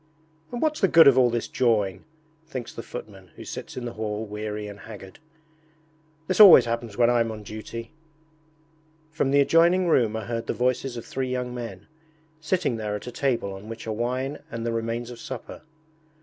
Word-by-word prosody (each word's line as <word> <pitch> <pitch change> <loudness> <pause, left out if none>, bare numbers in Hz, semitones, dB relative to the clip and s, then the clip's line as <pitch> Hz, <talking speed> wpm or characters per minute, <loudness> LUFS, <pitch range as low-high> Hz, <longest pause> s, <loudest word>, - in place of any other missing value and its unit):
'And 240 - -3
what's 305 -1 0
the 195 - +5
good 165 -3 +7
of 135 - +7
all 125 -2 +5
this 120 -1 -2
jawing?' 105 -6 0 0.4
thinks 130 -6 -6
the - - -6
footman 100 -6 -9
who - - -10
sits - - -7
in 125 - -4
the 120 - -5
hall 110 0 -3
weary 105 0 -5
and 100 0 -9
haggard. 100 -2 -11 1.1
'This 185 +5 -1
always 180 - +10
happens 115 -2 -4
when 120 -1 +5
I'm 115 -2 +2
on 110 -1 -8
duty.' 110 +3 -8 1.2
From 155 -3 0
the 140 +1 +5
adjoining 170 +5 +4
room 120 -9 +3
are 110 -2 -4
heard 115 0 -4
the - - 0
voices 125 0 -1
of 115 - -7
three 130 -1 -3
young 125 -1 -3
men, 115 -6 -7 0.5
sitting 155 -5 0
there 105 -1 -3
at 105 - -7
a 125 - -6
table 120 -7 -1
on 95 +3 -10
which 115 0 -7
are 110 - -2
wine 130 +5 -2
and 115 0 -5
the 115 - 0
remains 115 +1 -3
of 120 - -10
supper. 130 -3 -8
120 Hz, 190 wpm, -25 LUFS, 110-130 Hz, 1.2 s, always